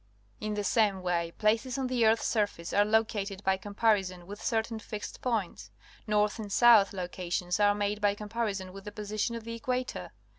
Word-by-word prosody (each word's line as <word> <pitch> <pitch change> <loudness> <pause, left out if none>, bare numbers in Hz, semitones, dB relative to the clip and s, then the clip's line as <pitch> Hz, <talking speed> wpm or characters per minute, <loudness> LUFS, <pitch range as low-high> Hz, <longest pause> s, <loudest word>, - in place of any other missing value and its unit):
In 215 0 -3
the 205 - -2
same 200 -3 +2
way, 170 -2 0
places 225 +4 +1
on 265 - -1
the 250 -3 +2
earth's 220 +1 +3
surface 205 -6 -1
are 205 - +5
located 205 -2 0
by 190 0 +3
comparison 195 -3 0
with 205 +3 -9
certain 225 -1 -1
fixed 210 -1 -7
points. 190 - -2 0.4
North 210 +1 +1
and 210 -2 -6
south 225 -3 +6
loca 180 -1 -5
tions 180 +1 -1
are 205 0 +4
made 205 +1 -1
by 205 -1 +2
comparison 205 -3 -3
with 195 0 -10
the 210 - -6
position 215 +2 -3
of 230 - -6
the 230 +1 -6
equator. 250 +2 -3
210 Hz, 185 wpm, -29 LUFS, 195-225 Hz, 0.4 s, south